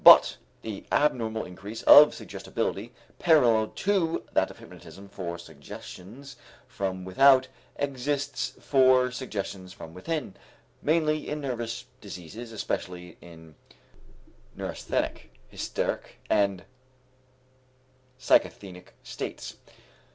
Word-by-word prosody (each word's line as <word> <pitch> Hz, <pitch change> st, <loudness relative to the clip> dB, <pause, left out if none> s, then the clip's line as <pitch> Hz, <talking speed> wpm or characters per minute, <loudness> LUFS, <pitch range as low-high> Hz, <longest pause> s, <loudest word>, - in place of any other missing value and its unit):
But -, -, +9 dB, 0.3 s
the 110 Hz, -3 st, -6 dB
abnormal 115 Hz, -7 st, +1 dB
increase 100 Hz, +5 st, -8 dB
of 150 Hz, +1 st, +9 dB
suggestibility -, -, -4 dB, 0.3 s
parallel 120 Hz, -10 st, +5 dB
to 185 Hz, -, 0 dB
that -, -, +3 dB
of -, -, -12 dB
hypnotism 100 Hz, +1 st, -13 dB
for 85 Hz, -3 st, -5 dB
suggestions 95 Hz, -, -11 dB, 0.3 s
from 95 Hz, -2 st, -3 dB
without 130 Hz, +7 st, +6 dB, 0.3 s
exists 140 Hz, -1 st, -2 dB
for 130 Hz, -2 st, +4 dB
suggestions 100 Hz, -7 st, -5 dB
from 80 Hz, -, -11 dB
within, 145 Hz, -, -3 dB, 0.5 s
mainly 155 Hz, -1 st, +1 dB
in 150 Hz, -, -2 dB
nervous 120 Hz, -4 st, -4 dB, 0.2 s
diseases, 105 Hz, +7 st, -9 dB
especially 90 Hz, -5 st, -4 dB
in 80 Hz, -2 st, -14 dB, 1.0 s
neurasthenic, -, -, -3 dB, 0.2 s
hysteric, -, -, -3 dB
and 100 Hz, -3 st, +2 dB, 1.5 s
psychasthenic 95 Hz, -7 st, 0 dB
states. -, -, -6 dB
115 Hz, 90 wpm, -27 LUFS, 95-140 Hz, 1.5 s, But